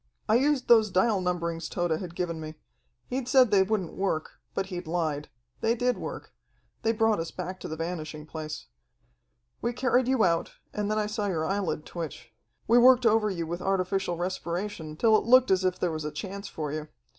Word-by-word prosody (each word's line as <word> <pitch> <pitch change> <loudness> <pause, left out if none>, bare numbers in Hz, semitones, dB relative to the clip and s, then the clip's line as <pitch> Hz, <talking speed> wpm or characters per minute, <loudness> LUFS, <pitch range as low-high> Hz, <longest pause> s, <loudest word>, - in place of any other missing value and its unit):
I 215 - +3
used 265 +2 +2
those 220 -3 +6
dial 190 +2 +2
numberings 170 -2 -2
Tode 175 -1 -1
had 175 -2 -7
given 170 -3 -2
me. 155 0 -7 0.5
He'd 255 0 -3
said 255 -4 +5
they 200 -2 +6
wouldn't 190 -3 0
work, 190 -5 -2 0.2
but 195 - 0
he'd 180 -3 -6
lied. 160 -3 -1 0.3
They 230 +1 +2
did 245 +1 +1
work. - - -7 0.5
They 225 - +2
brought 225 -3 +2
us 165 0 -3
back 185 +1 -6
to - - -6
the 155 - -4
Vanishing 155 -2 -5
Place. 155 -2 -6 1.0
"We 240 - -1
carried 250 0 +2
you 260 -4 +3
out, 170 -2 +1 0.2
and 210 -1 -2
then 215 - 0
I 215 - +1
saw 210 0 -2
your 165 -5 -1
eyelid 180 -5 -1
twitch. 135 -9 -7 0.3
We 235 +2 +6
worked 250 0 +6
over 220 -1 +4
you 170 -4 -3
with 170 +2 -4
artificial 190 -2 0
respiration 175 -2 -4
till 220 +2 +5
it 215 - +2
looked 255 -1 +6
as 190 0 +3
if 185 -1 +1
there 180 - 0
was 155 -1 -4
a 150 - -2
chance 195 +6 -6
for 150 -5 -4
you. 155 0 -4
185 Hz, 200 wpm, -28 LUFS, 165-220 Hz, 1.0 s, those